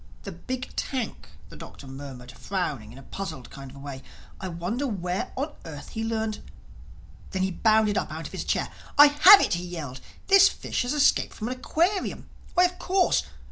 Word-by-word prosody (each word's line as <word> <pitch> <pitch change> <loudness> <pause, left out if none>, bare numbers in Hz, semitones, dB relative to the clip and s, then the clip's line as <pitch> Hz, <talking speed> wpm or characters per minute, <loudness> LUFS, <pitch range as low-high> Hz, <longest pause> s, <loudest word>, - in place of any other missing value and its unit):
"The - - -6
big 255 -1 -6
tank!" 260 -4 -3 0.2
the - - -12
Doctor - - -11
murmured 135 -2 -9
frowning 145 - -4
in 125 - -13
a 135 - -12
puzzled 135 -7 -7
kind 135 -1 -9
of 135 - -13
way. 140 -1 -8 0.4
"I 190 - -5
wonder 185 +11 -3
where 180 -5 -3
on 290 +3 -3
earth 150 -4 -9
he 225 - -4
learned—" 220 -1 -2 0.9
Then 190 0 -2
he 190 - 0
bounded 215 +1 +3
up - - -5
out - - -6
of - - -7
his - - -4
chair. - - -1 0.3
"I 290 - +11
have 370 +8 +9
it," - - +1
he 175 +1 -2
yelled, 155 -8 -7 0.2
"this 390 0 +7
fish - - -3
has 245 +3 -1
escaped 295 -1 +2
from 220 +2 -4
an 255 - -4
aquarium. 355 +9 -1 0.3
Why, 360 - +6
of 360 0 -3
course! 370 0 +2
200 Hz, 190 wpm, -26 LUFS, -, 0.9 s, I